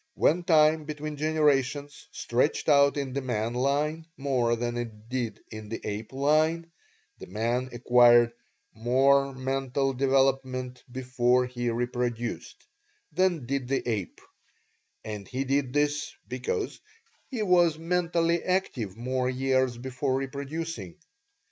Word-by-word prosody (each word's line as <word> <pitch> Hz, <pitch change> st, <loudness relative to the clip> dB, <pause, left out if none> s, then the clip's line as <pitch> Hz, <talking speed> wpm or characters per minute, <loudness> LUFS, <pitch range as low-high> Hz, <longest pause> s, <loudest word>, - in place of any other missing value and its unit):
When 170 Hz, +4 st, +3 dB
time 155 Hz, -2 st, +4 dB
between 150 Hz, 0 st, -5 dB
generations 145 Hz, -2 st, 0 dB
stretched 125 Hz, +6 st, 0 dB
out 140 Hz, -1 st, +5 dB
in 135 Hz, -2 st, -3 dB
the 140 Hz, -, -1 dB
man 120 Hz, -3 st, -2 dB
line 145 Hz, +5 st, 0 dB
more 130 Hz, -4 st, +1 dB
than 120 Hz, +1 st, -3 dB
it 115 Hz, -2 st, -6 dB
did 120 Hz, -4 st, -3 dB
in 110 Hz, -1 st, -8 dB
the 115 Hz, -, -4 dB
ape 105 Hz, +1 st, -5 dB
line, 155 Hz, +5 st, +1 dB, 0.5 s
the -, -, -9 dB
man 115 Hz, +6 st, -1 dB
acquired 120 Hz, 0 st, +5 dB, 0.4 s
MORE 135 Hz, +4 st, +3 dB
MENTAL 135 Hz, +1 st, -1 dB
DEVELOPMENT 130 Hz, -1 st, 0 dB
BEFORE 125 Hz, -1 st, +1 dB
HE 120 Hz, -1 st, -3 dB
REPRODUCED 120 Hz, 0 st, -3 dB, 0.5 s
than 175 Hz, -4 st, +1 dB
did 135 Hz, 0 st, -2 dB
the 135 Hz, -1 st, -1 dB
ape, 105 Hz, -7 st, -3 dB, 0.8 s
and 105 Hz, -3 st, -6 dB
he 130 Hz, +1 st, -2 dB
did 135 Hz, -1 st, 0 dB
this 145 Hz, +1 st, 0 dB, 0.2 s
because 460 Hz, -3 st, -3 dB, 0.5 s
he 240 Hz, -5 st, -3 dB
was 175 Hz, -5 st, +4 dB
mentally 170 Hz, 0 st, 0 dB
active 125 Hz, -, -1 dB
more 125 Hz, +1 st, -1 dB
years 130 Hz, -1 st, +1 dB
before 130 Hz, +2 st, -2 dB
reproducing. 145 Hz, +6 st, -5 dB
135 Hz, 125 wpm, -27 LUFS, 120-150 Hz, 0.8 s, out